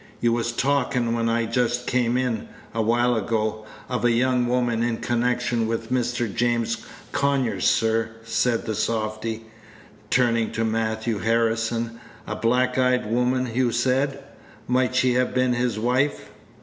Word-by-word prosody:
"You 120 -1 +2
was 120 0 0
talkin', 125 -2 0
when 115 0 0
I 115 0 +1
just 120 +1 0
came 125 -1 +1
in, 125 -4 -2 0.2
a 115 - 0
while 120 +2 +2
ago, 110 0 -1 0.2
of 125 -1 -2
a 120 - +4
young 125 +1 +2
woman 120 -2 +1
in 120 -1 0
connection 120 -1 0
with 115 +1 -3
Mr. 120 -1 0
James 115 -1 0 0.3
Conyers, 135 -9 0
sir," 115 0 +2
said 115 +1 0
the 110 - -2
softy, 110 +1 -2 0.6
turning 115 -2 +2
to 115 0 0
Matthew 110 0 -1
Harrison; 115 +1 0 0.2
"a - - -4
black 125 +2 +1
eyed 125 -2 +2
woman, 125 +1 +1
you 125 0 +2
said; 135 +3 0 0.4
might 125 0 +1
she 130 -1 +3
have 125 0 0
been 130 -1 +2
his 120 -2 0
wife?" 125 +6 0
120 Hz, 150 wpm, -24 LUFS, 115-125 Hz, 0.6 s, a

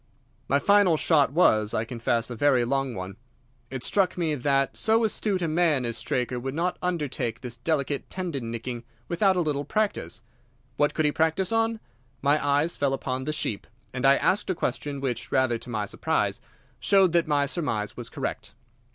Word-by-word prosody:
"My 140 - +3
final 200 +1 +4
shot 150 -4 +3
was, 110 -10 +3
I 110 - 0
confess 115 0 -1
a - - -4
very 130 -1 +3
long 135 0 -1
one. 95 +1 -6 0.5
It 130 -1 -5
struck 190 -3 +1
me 165 -3 0
that 135 0 +1
so 225 +1 +2
astute 205 -3 0
a - - +1
man 155 -5 +2
as 115 -1 -2
Straker 125 +1 -2
would 135 +3 -4
not 175 +3 -1
undertake 145 -10 -2
this 125 -2 -5
delicate 140 +2 -2
tendon 160 -11 -4
nicking 115 +1 -5 0.2
without 190 +2 +2
a 180 - +2
little 145 -3 -1
practice. 145 - -2 0.5
What 145 +2 +1
could 155 - +1
he 150 - +3
practice 160 +5 +1
on? 225 0 +1 0.4
My 145 +2 +3
eyes 145 +4 +2
fell 140 -1 +1
upon 130 -1 -4
the 155 - -1
sheep, 110 -8 -3 0.3
and 125 -1 -4
I 135 0 +6
asked 190 +7 +1
a 185 - +1
question 145 -3 -3
which, 130 -3 -3
rather 125 -3 +2
to 125 - -10
my 110 -3 -2
surprise, - - -1 0.4
showed 195 -3 +4
that 170 -1 +2
my 145 -2 +2
surmise 115 - -2
was 120 -2 -7
correct. 110 -8 -5
140 Hz, 185 wpm, -26 LUFS, 120-170 Hz, 0.5 s, I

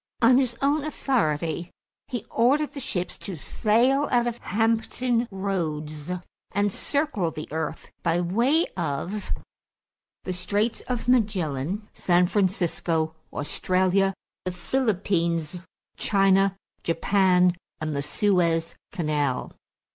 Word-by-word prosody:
On 245 +2 +6
his 245 -3 0
own 285 +1 +3
authority, 170 - 0 0.4
he 245 -5 -4
ordered 280 +6 +3
the 280 - -6
ships 180 -8 -3
to 195 - -6
sail 245 - +2
out 240 -1 +3
of 240 -1 -2
Hampton 230 +3 +1
Roads 160 -6 -3 0.4
and 205 +1 +2
circle 285 - 0
the 155 -1 -7
earth 160 0 -4
by 170 0 +1
way 235 - +2
of 175 +5 -3 0.9
the 185 - -3
Straits 205 +5 0
of 245 -2 -2
Magellan, 200 - +1
San 180 0 +3
Francisco, 175 -4 0 0.2
Australia, 185 +5 +1 0.3
the 185 - -2
Philippines, 180 - 0 0.4
China, 195 -1 +3 0.2
Japan, 180 +1 +3 0.2
and 155 -1 -2
the 140 - 0
Suez 165 0 +1 0.2
Canal. 150 -7 -1
190 Hz, 110 wpm, -26 LUFS, 165-230 Hz, 0.9 s, On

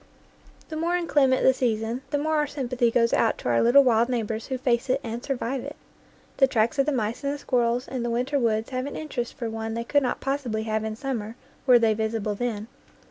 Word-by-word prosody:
The 315 - -5
more 340 +3 0
inclement 285 -6 +2
the 260 - +6
season, 230 -1 -1
the 290 - 0
more 310 +2 0
our 300 0 +1
sympathy 255 -4 0
goes 230 0 +2
out 225 - +2
to - - -4
our 120 - +3
little 270 +4 +6
wild 235 -1 +3
neighbors 225 -2 -2
who 260 - -2
face 245 0 0
it 260 +2 +2
and 235 +1 -5
survive 265 -1 -2
it. 285 +2 -7 0.6
The 270 - +5
tracks 230 +1 +1
of 275 - +3
the - - +2
mice 230 -1 -2
and 280 - 0
the - - -6
squirrels 245 -2 0
in 260 -2 -4
the 240 - -2
winter 250 +5 0
woods 225 -1 0
have 255 +1 -2
an 285 - -6
interest 255 -6 -4
for 235 - -4
one 225 0 -4
they 230 - -2
could 285 +4 +2
not 250 - -1
possibly 265 -6 -2
have 220 -1 -1
in 220 0 -3
summer 230 -4 -4 0.3
were 250 -1 +8
they 225 -2 +3
visible 220 -1 -2
then. 215 -1 -3
245 Hz, 230 wpm, -25 LUFS, 225-270 Hz, 0.6 s, were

